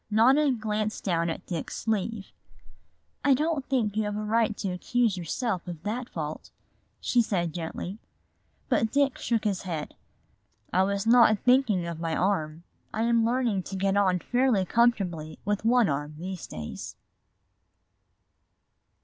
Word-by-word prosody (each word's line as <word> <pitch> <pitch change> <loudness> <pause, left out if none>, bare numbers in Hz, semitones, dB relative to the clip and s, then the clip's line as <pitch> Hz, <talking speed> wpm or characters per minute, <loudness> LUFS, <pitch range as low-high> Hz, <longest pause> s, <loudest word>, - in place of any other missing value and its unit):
Nona 260 +7 +4
glanced 215 -2 -2
down 170 -3 +1
at 165 - -5
Dick's 170 -4 -4
sleeve. 220 -1 -2 0.9
"I 280 -2 +5
don't 305 0 0
think 225 -7 +1
you 215 0 +1
have 210 0 -3
a 215 - -3
right 220 0 +1
to 195 - -2
accuse 225 +4 +1
yourself 180 - -3
of 170 -2 -7
that 235 +4 -3
fault," 155 -2 -5 0.5
she 245 - +2
said 175 -7 -1
gently. 175 +4 -5 0.7
But 225 -1 +1
Dick 280 -1 +2
shook 230 -2 0
his 205 -4 0
head. 165 -5 -5 0.8
"I 185 - +4
was 200 +1 0
not 230 -2 +6
thinking 245 -7 +3
of 170 -1 -5
my 165 -1 -1
arm; 165 -4 -1 0.3
I 220 - -1
am 230 -1 +3
learning 235 -4 +1
to 195 - -7
get 195 +1 +1
on 190 -3 +3
fairly 245 -1 +1
comfortably 185 -9 +1
with 205 +1 -1
one 240 -1 +4
arm 145 +1 -3
these 185 +2 -6
days." 75 -1 -7
205 Hz, 150 wpm, -27 LUFS, 180-235 Hz, 0.9 s, not